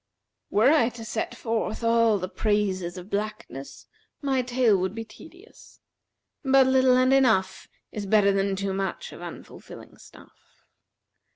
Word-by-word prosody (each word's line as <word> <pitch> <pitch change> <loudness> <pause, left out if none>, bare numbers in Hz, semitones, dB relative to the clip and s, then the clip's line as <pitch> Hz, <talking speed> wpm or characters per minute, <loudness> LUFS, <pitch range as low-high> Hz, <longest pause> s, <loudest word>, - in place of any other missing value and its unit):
Were 225 +7 +4
I 290 -7 +3
to 225 - -8
set 220 0 -4
forth 225 0 -3
all 230 -2 +3
the 185 -1 -4
praises 190 -4 -1
of 180 +3 -10
blackness, 205 -9 -5 0.3
my 270 -3 0
tale 245 -3 +2
would 190 +2 -2
be 225 0 -5
tedious; 350 - -17 0.6
but 270 -1 +5
little 260 -1 +4
and 255 +1 +3
enough 225 -8 +2 0.2
is 205 -2 -6
better 200 -1 +4
than 195 0 0
too 195 0 -3
much 195 0 -4
of - - -11
unfilling - - -11
stuff. - - -19
220 Hz, 145 wpm, -25 LUFS, 195-255 Hz, 0.6 s, but